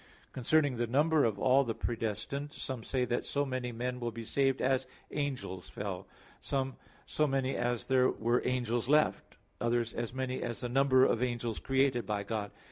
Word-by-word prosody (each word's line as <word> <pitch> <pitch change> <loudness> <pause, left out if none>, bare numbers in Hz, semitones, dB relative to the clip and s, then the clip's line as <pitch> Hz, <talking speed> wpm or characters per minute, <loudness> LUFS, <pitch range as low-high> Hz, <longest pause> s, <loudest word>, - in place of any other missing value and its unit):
Concerning 140 +1 +2
the 120 0 0
number 150 +5 +3
of 110 -3 0
all 130 +5 +4
the 115 -4 -3
predestined, 115 +5 -3
some 130 -4 -5
say 130 +1 0
that 120 0 -1
so 145 0 -1
many 130 -2 -3
men 125 +2 -3
will 120 -1 -2
be 115 +1 -7
saved 135 +2 +1
as 130 0 +1 0.2
angels 130 -11 -3
fell; 100 -3 -5 0.3
some, 135 -1 -1 0.3
so 155 - +1
many 135 -1 0
as 120 -1 -1
there 130 -1 +4
were 120 +2 +1
angels 120 -1 0
left; 150 +1 +2 0.2
others, 120 -1 0
as 120 -1 -3
many 130 0 -3
as 120 -1 -3
the 125 - -2
number 130 0 +5
of 115 - +1
angels 120 -3 -1
created 135 -2 +1
by 105 -1 -1
God. 105 0 -3
125 Hz, 180 wpm, -32 LUFS, 115-135 Hz, 0.3 s, number